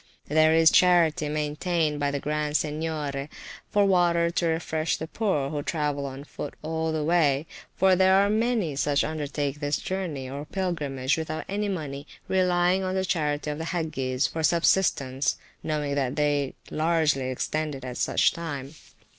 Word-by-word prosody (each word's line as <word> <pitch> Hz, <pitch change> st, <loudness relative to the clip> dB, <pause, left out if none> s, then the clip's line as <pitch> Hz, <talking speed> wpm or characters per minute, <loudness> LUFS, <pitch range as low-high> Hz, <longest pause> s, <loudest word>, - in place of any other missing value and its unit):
There 155 Hz, +1 st, +4 dB
is 165 Hz, 0 st, +6 dB
a -, -, -9 dB
charity 170 Hz, -4 st, +4 dB
maintained 150 Hz, +1 st, -1 dB
by 145 Hz, 0 st, +1 dB
the 140 Hz, 0 st, -2 dB
Grand 150 Hz, +1 st, 0 dB
Seignior, 150 Hz, -2 st, -3 dB, 0.4 s
for 205 Hz, -1 st, +3 dB
water 170 Hz, -3 st, +3 dB
to 170 Hz, 0 st, 0 dB
refresh 160 Hz, -1 st, -1 dB
the 160 Hz, -, -4 dB
poor 160 Hz, -7 st, -1 dB
who 150 Hz, -1 st, -2 dB
travel 145 Hz, -2 st, -2 dB
on 135 Hz, +1 st, -7 dB
foot -, -, -7 dB
all 160 Hz, +1 st, -1 dB
the 155 Hz, -1 st, -1 dB
way; 150 Hz, -3 st, +2 dB, 0.3 s
for 190 Hz, -1 st, +4 dB
there 190 Hz, +1 st, +5 dB
are 200 Hz, +1 st, +4 dB
many 215 Hz, -, 0 dB
such 145 Hz, +1 st, +1 dB
undertake 145 Hz, -2 st, -3 dB
this 145 Hz, 0 st, 0 dB
journey 170 Hz, -9 st, -4 dB
(or 140 Hz, +2 st, -5 dB
pilgrimage) 150 Hz, -7 st, -1 dB
without 155 Hz, 0 st, -4 dB
any 205 Hz, +1 st, -2 dB
money, 145 Hz, -6 st, -5 dB, 0.2 s
relying 180 Hz, 0 st, +2 dB
on 185 Hz, 0 st, -2 dB
the 190 Hz, 0 st, 0 dB
charity 150 Hz, -4 st, -1 dB
of 150 Hz, -, -5 dB
the 160 Hz, -, -3 dB
Hagges 145 Hz, -7 st, -1 dB
for 160 Hz, -, -2 dB
subsistence, 155 Hz, -5 st, +2 dB, 0.2 s
knowing 150 Hz, -2 st, -2 dB
that 135 Hz, -2 st, -1 dB
they 145 Hz, -2 st, 0 dB, 0.2 s
largely 155 Hz, -5 st, +1 dB
extend 150 Hz, +3 st, -2 dB
it 135 Hz, -1 st, -9 dB
at 125 Hz, -1 st, -6 dB
such -, -, +3 dB
a -, -, -12 dB
time. 145 Hz, -4 st, -6 dB
155 Hz, 170 wpm, -26 LUFS, 145-170 Hz, 0.4 s, is